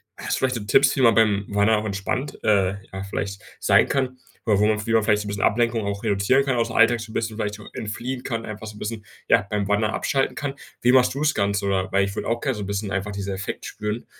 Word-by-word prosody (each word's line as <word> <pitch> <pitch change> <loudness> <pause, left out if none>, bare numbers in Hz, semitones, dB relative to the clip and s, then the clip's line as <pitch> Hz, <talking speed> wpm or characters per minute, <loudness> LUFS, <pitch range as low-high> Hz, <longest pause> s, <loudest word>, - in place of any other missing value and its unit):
hast - - -2
du - - -3
vielleicht 130 -1 +1
so 115 - -4
Tipps, 130 +7 +4
wie 135 - 0
man 115 -3 +5
beim 105 -2 +3
Wandern 105 +1 +3
auch 110 - -6
entspannt, 100 +7 -3
äh, 100 -2 +3 0.2
ja, 95 0 -4
vielleicht 100 0 -4 0.2
sein - - +4
kann? 130 -2 -1 0.3
Oder 105 -3 +3
wo 105 - +4
man 110 0 +1
wie 115 - +1
man 115 -1 +4
vielleicht 105 -1 +2
so - - -11
'n - - -6
bisschen 100 -1 -2
Ablenkung 115 0 +2
auch 100 +1 -3
reduzieren 105 +7 +3
kann, 135 -2 +1
ausm 115 -1 0
Alltag 115 0 +4
so 115 0 -8
'n - - -12
bisschen 110 -2 -2
vielleicht 105 -2 -2
so 105 - -12
entfliehen 125 +4 -4
kann 115 -3 -3
einfach 105 0 -7
so 110 -1 -9
'n - - -11
bisschen, 110 -1 -5 0.2
ja, - - +5
beim 105 -2 -1
Wandern 105 +2 +1
abschalten 135 -1 0
kann. 140 -1 -3 0.3
Wie 125 +1 +4
machst 130 -1 +5
du's 150 +3 +1
Ganze, 100 0 0
oder 95 -1 0
weil 100 0 +3
ich 100 0 -6
würde - - -3
auch 115 0 0
gerne 130 0 -1
so 105 - -5
'n - - -5
bisschen 100 0 -2
einfach 100 +2 -2
dieser 100 0 -4
Effekt 100 +1 -5
spüren 105 +2 -4
105 Hz, 270 wpm, -23 LUFS, 100-120 Hz, 0.3 s, man